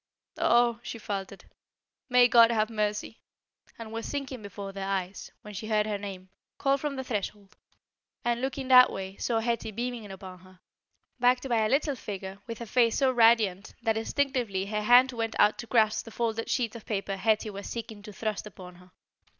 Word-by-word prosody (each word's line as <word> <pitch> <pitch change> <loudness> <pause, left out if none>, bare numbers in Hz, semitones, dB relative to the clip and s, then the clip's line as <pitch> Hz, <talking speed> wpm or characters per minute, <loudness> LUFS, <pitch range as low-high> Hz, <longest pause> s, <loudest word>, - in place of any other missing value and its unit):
"Oh!" 235 0 +3
she 235 - -6
faltered, 200 -2 -6 0.6
"may 250 -1 +6
God 235 -1 +7
have 220 -1 +1
mercy!" 210 0 -2 0.6
and 225 -1 -8
was 225 0 -5
sinking 275 -4 -5
before 200 -1 -7
their 195 0 -5
eyes, 190 -1 -3
when 210 - -9
she 210 +2 -6
heard 215 -1 +2
her 210 -2 -2
name, 190 -2 -8 0.3
called 275 0 +1
from 295 -2 -2
the 265 - -4
threshold, 205 -4 -5 0.7
and, 240 0 0
looking 265 0 -3
that 250 -1 +8
way, 190 0 -6
saw 235 - -1
Hetty 230 -1 -1
beaming 235 -1 -5
upon 190 -1 -10
her, 185 0 -19 0.6
backed 250 +2 +3
by 230 -3 +2
a 215 - +1
little 285 +2 +1
figure 195 -4 -7
with 230 -1 -7
a - - -4
face 230 0 +2
so 265 -2 +3
radiant 225 -5 +3
that 225 -2 +2
instinctively 230 -4 -1
her 210 +1 -2
hand 245 +4 +6
went 225 -2 -3
out 210 +1 +4
to 235 - -6
grasp 215 -3 +2
the - - -9
folded 225 0 -2
sheet 235 -3 0
of 230 - -9
paper 195 -2 -2
Hetty 215 +2 +1
was 200 0 -7
seeking 225 -3 -6
to 210 +1 -10
thrust 215 0 -4
upon 180 -3 -12
her. 180 0 -18
220 Hz, 190 wpm, -28 LUFS, 200-240 Hz, 0.7 s, that